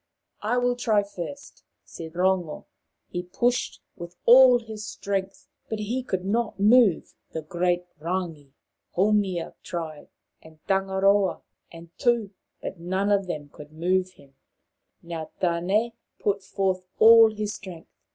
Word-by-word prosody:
" - - -46
I 245 - +2
will 245 0 +2
try 220 -4 +2
first," 200 +8 -9 0.2
said 160 -1 -9
Rongo. 180 -3 0 0.5
He 175 - -2
pushed 240 +8 -1
with 175 0 -9
all 250 +1 +8
his 220 -2 -8
strength, 195 -1 -4 0.2
but 220 - -2
he 220 +5 -2
could 190 -7 -3
not 230 +2 -1
move 215 -2 +4 0.2
the 160 - -4
great 175 +2 0
Rangi. 165 -4 -4 0.4
Haumia 195 -3 +1
tried, 160 -4 -6 0.3
and 160 0 -16
Tangaroa, 195 0 +2 0.3
and 165 0 -13
Tu, 235 -5 +1 0.3
but 185 - -6
none 190 +4 -1
of 200 -2 +2
them 150 -4 -5
could 150 +1 -13
move 185 +3 0
him. 140 -4 -20 0.7
Now 165 -2 -6
Tane 185 +7 +1 0.3
put 200 -1 -1
forth 190 -1 -1 0.2
all 225 0 +8
his 210 0 -3
strength. 185 -5 -10
190 Hz, 135 wpm, -25 LUFS, 170-215 Hz, 0.7 s, all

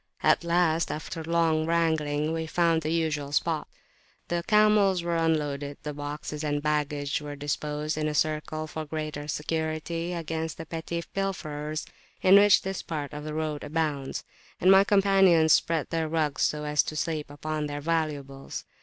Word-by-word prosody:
At - - +4
last, 170 -1 +2
after 160 +1 -5
long 165 -1 +1
wrangling, 160 -2 +1
we 160 0 -2
found 165 0 +2
the 155 - -2
usual 155 -4 -1
spot; 155 +1 0 0.6
the 170 0 -1
camels 210 -4 +4
were 170 0 -1
unloaded, 150 -3 0
the 150 - -4
boxes 145 +1 -5
and 145 -1 0
baggage 150 -1 -1
were 145 -1 -6
disposed 150 +1 -2
in 155 - 0
a 150 - -2
circle 155 0 -1
for 155 0 -5
greater 155 -1 -5
security 160 +3 -2
against 160 -1 -3
the 165 - -7
petty 165 +1 -4
pilferers 155 -6 -3 0.4
in 185 - +6
which 205 -1 +6
this 190 0 -3
part 150 -3 -5
of 150 0 -6
the 155 0 -5
road 155 -2 -2
abounds, 150 -3 -2 0.4
and 185 - +5
my 195 0 +8
companions 195 -5 +5
spread 165 -3 +1
their 165 -1 0
rugs 155 -3 0
so 150 0 +1
as 150 0 +2
to 155 - -6
sleep 155 -1 -2
upon 150 +1 -3
their 145 0 -4
valuables. 145 -4 -3
155 Hz, 165 wpm, -27 LUFS, 150-165 Hz, 0.6 s, my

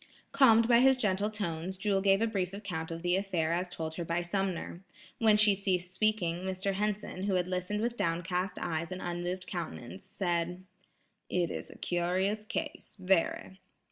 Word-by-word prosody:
Calmed 230 -5 +6
by 235 -1 +6
his 265 +1 +6
gentle 205 -3 +1
tones, 185 -3 -3
Jewel 195 0 +1
gave 195 +2 +4
a - - +4
brief 195 -5 -2
account 180 -6 -4
of 165 0 -6
the 175 0 +2
affair 185 -5 0
as 180 +2 -1
told 160 -2 -4
her 175 - -2
by 170 +1 -1
Sumner. 185 -1 -2 0.4
When 220 -2 +5
she 210 -1 +6
ceased 185 -2 -1
speaking 190 -4 +1
Mr. 190 +2 -2
Henson, 205 -1 -2
who 195 -2 +1
had 180 -1 +1
listened 185 +3 -2
with 235 +1 -1
down 165 +1 0
cast 180 +1 -2
eyes 170 +1 -2
and 185 - -4
unmoved 175 +1 -3
countenance, 170 0 -6
said: 180 -1 -2 0.7
"It 175 -2 0
is - - -5
a - - -12
curious 185 +5 0
case, - - -5
very. 190 0 0
185 Hz, 175 wpm, -31 LUFS, 175-205 Hz, 0.7 s, Calmed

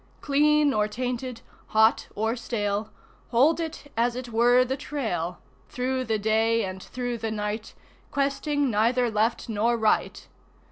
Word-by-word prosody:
Clean 295 0 +3
or 210 0 +2
tainted, 250 +1 -4 0.3
hot 220 +1 +3
or 220 +3 0
stale, 210 -3 -2 0.4
Hold 280 +8 +4
it 320 -3 -6
as 235 +1 +1
it 250 -1 -6
were 240 +2 +4
the 260 +1 -2
Trail, 220 - -3 0.3
Through 255 +1 -2
the 220 -2 0
day 220 +1 +2
and 190 0 -6
through 245 +1 -4
the 225 0 -2
night, 210 0 -4 0.3
Questing 280 0 0
neither 235 +3 +2
left 220 +2 0
nor 230 +2 +1
right. 220 -1 0
235 Hz, 140 wpm, -26 LUFS, 220-255 Hz, 0.4 s, Hold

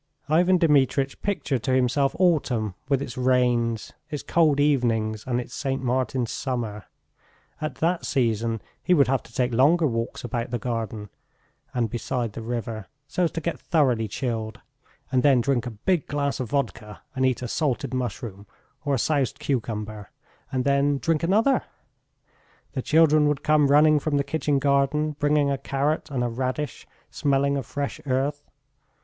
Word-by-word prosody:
Ivan 175 +5 +4
Dmitritch 140 -4 +2
pictured 150 - -1
to 130 - 0
himself 130 +2 +2
autumn 135 - +1 0.2
with 140 -1 +2
its 125 -2 -7
rains, 125 -3 +1 0.2
its 150 - -4
cold 155 -4 +3
evenings, 115 -7 +1
and 125 -1 0
its 125 - -7
St. 135 -2 -2
Martin's 125 -1 -1
summer. 115 -6 -3 0.8
At 155 -3 -3
that 170 +5 0
season 115 -3 0 0.2
he 180 - +3
would 140 -4 +4
have 135 -1 +1
to - - -18
take 125 +1 0
longer 155 +8 +4
walks 115 -4 -2
about 120 0 -3
the 120 - -1
garden 110 -3 -4 0.6
and 120 -2 0
beside 120 0 -3
the 115 - -6
river, 115 -3 -4 0.2
so 175 +5 0
as 165 - -1
to 165 - -3
get 170 +2 -3
thoroughly 130 -9 +1
chilled, 110 -1 -3 0.5
and 130 -1 +3
then 135 -2 +5
drink 125 0 0
a 110 -3 -7
big 180 -5 +2
glass 140 -1 -1
of 125 -4 -3
vodka 115 -6 -3
and 130 - 0
eat 130 -1 +1
a - - -2
salted 130 -2 -1
mushroom 115 -5 -4 0.4
or 145 -1 +1
a - - 0
soused 140 -1 0
cucumber, 110 -5 -3 0.4
and 130 -1 0
then 140 +1 +2
drink 160 +2 0
another.... 215 +10 +3 1.1
The 130 - -2
children 155 0 +4
would 150 -2 -1
come 150 -1 +4
running 150 +2 +5
from 145 0 0
the 140 - +2
kitchen 150 -1 0
garden, 140 +2 +2
bringing 145 -1 +2
a 135 - -1
carrot 145 +4 -1
and 130 -4 -1
a - - +1
radish 130 +5 -3 0.2
smelling 140 -1 +1
of 135 -4 -3
fresh 145 +2 -4
earth.... 140 +3 0
135 Hz, 165 wpm, -25 LUFS, 120-145 Hz, 1.1 s, then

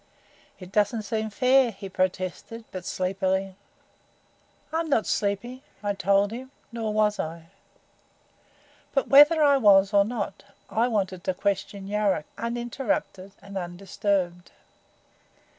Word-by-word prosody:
"It 185 -1 -12
doesn't 210 +2 +1
seem 220 +1 -2
fair," 255 +3 +4
he 195 -2 -8
protested, 185 +4 -3
but 185 -2 -7
sleepily. 190 +1 -1 1.2
"I'm 325 0 -1
not 230 -7 +2
sleepy," 215 +6 -2 0.2
I 205 0 0
told 200 +1 +2
him; 255 +3 -7 0.2
nor 225 -2 -3
was 210 -1 +1
I. 165 +1 -6 1.4
But 275 - +1
whether 295 +3 +7
I 285 -1 +5
was 200 -4 +5
or 200 0 +6
not, 235 +4 -4 0.3
I 230 +2 +2
wanted 190 -6 -2
to 185 - 0
question 200 0 -2
Yuruk, 205 -6 0
uninterrupted 235 -5 -3
and 200 0 -11
undisturbed. 180 0 -2
200 Hz, 120 wpm, -26 LUFS, 190-235 Hz, 1.4 s, whether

